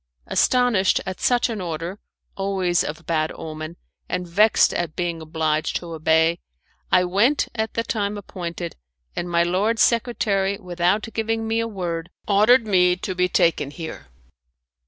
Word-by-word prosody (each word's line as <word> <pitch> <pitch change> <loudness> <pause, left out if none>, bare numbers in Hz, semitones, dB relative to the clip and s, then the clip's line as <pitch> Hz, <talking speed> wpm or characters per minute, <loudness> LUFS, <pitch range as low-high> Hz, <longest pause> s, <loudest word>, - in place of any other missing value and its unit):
Astonished 245 -7 +3
at 185 -1 -5
such 245 -1 +2
an 225 -5 -4
order 170 +3 -4 0.4
always 190 -3 0
of 160 +3 -6
bad 155 -1 0
omen, 155 +1 -7 0.3
and 180 0 -2
vexed 210 +6 +4
at 170 -3 -2
being 170 -2 -2
obliged 155 -1 -1
to 170 -1 -4
obey, 160 +1 +2 0.5
I 180 - +5
went 205 +11 +2
at 220 -1 -3
the 230 - 0
time 205 -2 -2
appointed, 175 -3 -6 0.4
and 175 - -3
my 170 0 +3
lord 195 +6 +1
secretary, 210 -4 +1
without 180 +1 0
giving 225 0 -1
me 225 +1 0
a 230 - 0
word, 170 -6 -4 0.2
ordered 215 +4 +5
me 180 -3 +4
to 190 +1 -4
be 180 0 +1
taken 165 -5 +2
here." 160 - -8
180 Hz, 150 wpm, -23 LUFS, 170-215 Hz, 0.5 s, I